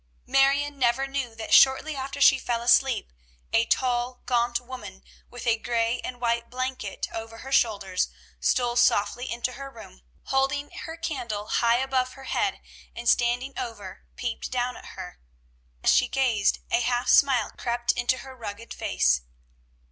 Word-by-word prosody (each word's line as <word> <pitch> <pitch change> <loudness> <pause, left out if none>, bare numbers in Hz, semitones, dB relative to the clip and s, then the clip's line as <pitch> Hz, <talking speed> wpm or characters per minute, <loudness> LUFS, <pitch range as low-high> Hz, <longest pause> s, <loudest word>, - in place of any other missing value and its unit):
Marion 280 +1 +2
never 250 +2 +2
knew 270 -4 -4
that 225 - -4
shortly 275 +3 +6
after 275 +1 -5
she 270 -1 +6
fell 235 -2 -2
asleep 245 - +3 0.4
a 225 0 +4
tall, 250 0 0
gaunt 240 -1 +1
woman 240 -6 -10 0.3
with 245 0 -9
a 230 -2 +2
gray 230 +1 0
and 245 -1 -6
white 235 -1 0
blanket 255 +1 -4
over 225 0 -6
her 265 +3 -9
shoulders 200 -7 +1 0.3
stole 240 - +1
softly 240 +1 +2
into 240 +2 -2
her 275 +2 -8
room, 225 - -13 0.2
holding 270 +2 0
her 325 0 -7
candle 245 -11 -4
high 235 0 +3
above 255 0 0
her 270 -1 -10
bed, 405 -2 0 0.3
and 235 - -6
standing 245 +3 +2
over, 205 -5 -7
peered 240 -2 -4
down 250 0 -1
at - - -11
her. 180 -1 -8 0.6
As - - +5
she 250 - +4
gazed, 240 -6 +2
a 235 - +3
half 245 +1 0
smile 260 -6 +4
crept 240 0 0
into 240 +2 0
her 265 -1 -10
rugged 230 -1 -7
face. 60 0 +1
245 Hz, 155 wpm, -26 LUFS, 230-265 Hz, 0.6 s, shortly